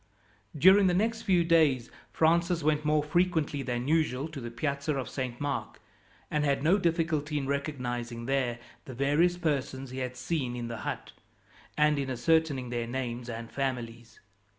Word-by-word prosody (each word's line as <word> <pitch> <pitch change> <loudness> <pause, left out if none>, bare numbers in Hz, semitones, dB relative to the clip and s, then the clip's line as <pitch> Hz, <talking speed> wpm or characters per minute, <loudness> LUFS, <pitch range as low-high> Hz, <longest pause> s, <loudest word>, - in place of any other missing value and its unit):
During 190 +5 +7
the 180 - +2
next 225 +4 0
few 180 -4 +3
days 155 -8 +3 0.2
Francis 170 +1 +2
went 150 0 +2
more 150 0 +2
frequently 160 -2 +1
than 125 -1 -3
usual 150 -3 +1
to 150 -4 -7
the 120 - -5
Piazza 140 +4 -2
of 135 -2 -3
Saint 125 -3 -4
Mark, 145 -1 -3 0.5
and 150 -1 +1
had 140 -1 +1
no 180 +6 +4
difficulty 160 -4 0
in 140 - -2
recognizing 125 -4 -3
there 130 -2 0 0.3
the 130 - -8
various 150 +7 +2
persons 135 -5 -2
he 130 - -5
had 125 -1 -4
seen 130 -2 -2
in 120 -1 -4
the 115 - -5
hut, - - -5 0.7
and 150 -1 +3
in 135 -1 -2
ascertaining 135 0 +1
their 120 -1 -2
names 120 -1 -4
and 115 0 -6
families. 120 -4 -4
140 Hz, 165 wpm, -29 LUFS, 125-160 Hz, 0.7 s, During